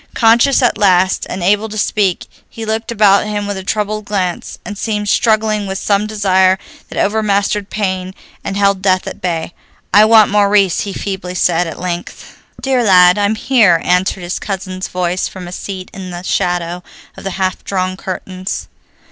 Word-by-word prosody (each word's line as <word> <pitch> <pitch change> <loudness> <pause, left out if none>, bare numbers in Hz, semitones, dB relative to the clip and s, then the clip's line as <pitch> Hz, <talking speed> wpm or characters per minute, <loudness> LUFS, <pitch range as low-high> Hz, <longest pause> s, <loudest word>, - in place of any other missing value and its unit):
Conscious 240 +4 +4
at 245 - +2
last, 185 -1 +3
and 185 - -4
able 205 +4 +2
to 215 - -6
speak, 200 -3 0 0.2
he 225 - -7
looked 220 +2 -2
about 205 -2 +4
him 205 -1 -2
with 205 0 -3
a 190 - -6
troubled 210 +1 -2
glance, 185 -4 -3
and 210 - -6
seemed 210 0 -2
struggling 215 -1 +1
with 190 0 -3
some 205 +1 0
desire 190 -3 +2 0.3
that - - -8
overmastered 205 -1 0
pain 190 -2 -3 0.3
and 195 - -3
held 200 -1 +2
death 185 -1 +2
at - - -7
bay. 170 -2 -3 0.4
"I 210 +1 +7
want 220 -2 +6
Maurice," 200 -3 +3
he 200 - -3
feebly 190 -2 -5
said, 175 -1 +1
at 160 - -7
length. 175 -1 -6 0.2
"Dear 265 -2 +1
lad, 180 -2 +6
I'm 205 +2 +1
here," 215 -8 +3
answered 180 +1 +1
his 175 +1 -3
cousin's 185 -2 -5
voice 180 0 -1
from 185 -2 -9
a - - -8
seat 185 0 -7
in 190 -1 -7
the 175 0 -7
shadow 175 -1 -1 0.3
of - - -11
the 195 - -3
half 185 -1 -2
drawn 185 -1 -2
curtains. 185 0 -6
195 Hz, 175 wpm, -15 LUFS, 185-210 Hz, 0.4 s, I